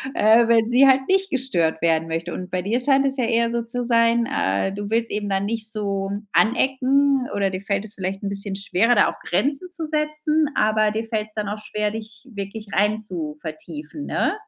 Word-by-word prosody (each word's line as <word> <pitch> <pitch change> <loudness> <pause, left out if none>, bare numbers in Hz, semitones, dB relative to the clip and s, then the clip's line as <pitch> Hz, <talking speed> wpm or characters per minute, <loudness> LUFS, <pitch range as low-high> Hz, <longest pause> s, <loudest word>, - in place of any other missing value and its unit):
äh, 225 +2 +5
wenn 230 -1 +3
sie 270 +3 +6
halt 265 0 +4
nicht 385 0 +2
gestört 175 - 0
werden 165 -1 +2
möchte. 165 +1 -3
Und 185 0 -6
bei 185 -1 -1
dir 230 +6 -1
scheint 275 0 +3
es 270 0 -1
ja 250 - +1
eher 230 0 +1
so 235 0 -1
zu 240 +1 -4
sein, 230 0 +3
äh, 100 - 0
du 205 0 -5
willst 230 +1 0
eben 205 -1 -2
dann 195 0 0
nicht 220 0 -3
so 200 -2 -2 0.2
anecken 265 +3 +2
oder 200 -1 +1
dir 185 0 -4
fällt 200 +1 -2
es 215 - -13
vielleicht 190 0 -4
'n 200 - -1
bisschen 200 0 -5
schwerer, 200 +4 +2
da - - +4
auch - - -8
Grenzen 290 +6 -1
zu 350 -2 -5
setzen, 305 0 0
aber 215 0 +3
dir 220 +2 -3
fällt 215 -2 -2
es 215 - -15
dann 210 -2 -2
auch 210 - -4
schwer, 210 0 -2
dich 215 0 -9
wirklich 200 +1 -7
reinzuvertiefen, 165 - -3
ne? - - 0
215 Hz, 205 wpm, -22 LUFS, 195-245 Hz, 0.2 s, sie